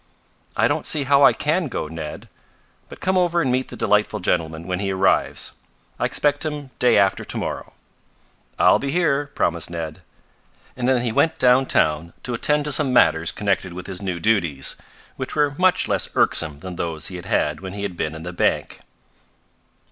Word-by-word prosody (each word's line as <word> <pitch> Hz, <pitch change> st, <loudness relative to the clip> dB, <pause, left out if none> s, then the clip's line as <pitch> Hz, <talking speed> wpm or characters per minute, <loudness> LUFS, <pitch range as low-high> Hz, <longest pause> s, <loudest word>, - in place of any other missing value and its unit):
"I -, -, +4 dB
don't -, -, -1 dB
see 150 Hz, -, 0 dB
how 140 Hz, +1 st, +4 dB
I -, -, +8 dB
can 160 Hz, +3 st, 0 dB
go, 120 Hz, -, -4 dB
Ned. 80 Hz, -1 st, -7 dB, 0.6 s
But -, -, -12 dB
come 185 Hz, 0 st, +2 dB
over 175 Hz, -1 st, +2 dB
and 135 Hz, -7 st, +1 dB
meet 130 Hz, +1 st, 0 dB
the -, -, -9 dB
delightful 105 Hz, +1 st, +1 dB
gentleman 80 Hz, -3 st, -1 dB
when 90 Hz, 0 st, -2 dB
he 100 Hz, -1 st, -2 dB
arrives. 95 Hz, 0 st, +1 dB, 0.5 s
I -, -, +1 dB
expect 145 Hz, 0 st, +1 dB
him 150 Hz, -3 st, -5 dB
day 125 Hz, -, +4 dB
after 100 Hz, -1 st, +2 dB
to -, -, -5 dB
morrow." -, -, -5 dB, 0.8 s
"I'll -, -, +5 dB
be 140 Hz, -, -3 dB
here," 145 Hz, -3 st, +1 dB
promised 85 Hz, -1 st, 0 dB
Ned; 80 Hz, -2 st, -6 dB, 0.7 s
and 125 Hz, 0 st, -1 dB
then 125 Hz, -2 st, +2 dB
he 120 Hz, -, -1 dB
went 160 Hz, +8 st, +2 dB
downtown 85 Hz, -, +2 dB
to 125 Hz, -, -3 dB
attend 150 Hz, +5 st, +1 dB
to 150 Hz, -, -2 dB
some 140 Hz, -1 st, +2 dB
matters 85 Hz, -9 st, +4 dB
connected 95 Hz, -3 st, -1 dB
with 90 Hz, 0 st, -7 dB
his 95 Hz, 0 st, -4 dB
new 95 Hz, -3 st, -3 dB
duties, 85 Hz, -10 st, 0 dB, 0.4 s
which 130 Hz, -, -4 dB
were 145 Hz, -2 st, +2 dB
much 185 Hz, 0 st, +3 dB
less -, -, +1 dB
irksome 75 Hz, -3 st, +1 dB
than 90 Hz, -1 st, -7 dB
those 80 Hz, -2 st, -1 dB
he 90 Hz, -, -7 dB
had 90 Hz, -, -9 dB
had 75 Hz, 0 st, 0 dB
when 95 Hz, -1 st, -7 dB
he 100 Hz, 0 st, -5 dB
had 100 Hz, -3 st, -4 dB
been 80 Hz, -2 st, -3 dB
in 80 Hz, -, -8 dB
the 90 Hz, +1 st, -6 dB
bank. -, -, 0 dB
100 Hz, 190 wpm, -22 LUFS, 85-140 Hz, 0.8 s, I